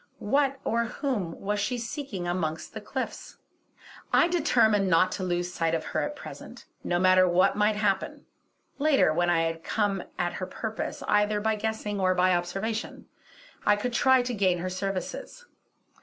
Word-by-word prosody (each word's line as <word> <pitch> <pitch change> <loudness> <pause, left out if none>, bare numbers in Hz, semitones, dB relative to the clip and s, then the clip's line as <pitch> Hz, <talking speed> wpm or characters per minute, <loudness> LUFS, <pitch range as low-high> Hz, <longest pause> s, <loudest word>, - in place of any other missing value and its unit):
What 275 +4 +1
or 235 +1 +1
whom 225 - -3
was 205 +1 -2
she 245 +5 -1
seeking 230 -6 -5
amongst 170 -3 -3
the - - -6
cliffs? - - -5 0.7
I 340 - +5
determined 235 - +3
not 185 +1 +4
to 190 - -4
lose 175 0 -2
sight 165 -1 0
of 160 - -3
her - - -1
at 295 - -3
present, - - -10 0.2
no 175 - 0
matter 185 0 +5
what 180 +1 +3
might 210 +1 +2
happen; 200 -2 -1 0.5
later, 280 - +4
when 175 +2 +1
I 165 -1 +3
had 165 0 -3
come 205 -3 0 0.2
at 175 0 -1
her 185 - -4
purpose, 220 +3 -5
either 210 0 +2
by 220 +1 +1
guessing 215 -1 -3
or 185 -1 +2
by 185 +1 +3
observation, 195 +6 -3 0.5
I 205 - +4
could 235 +4 -3
try 260 0 +4
to 245 0 -3
gain 190 -4 +2
her 185 +2 -4
services. 195 - -5
200 Hz, 170 wpm, -27 LUFS, 180-225 Hz, 0.7 s, I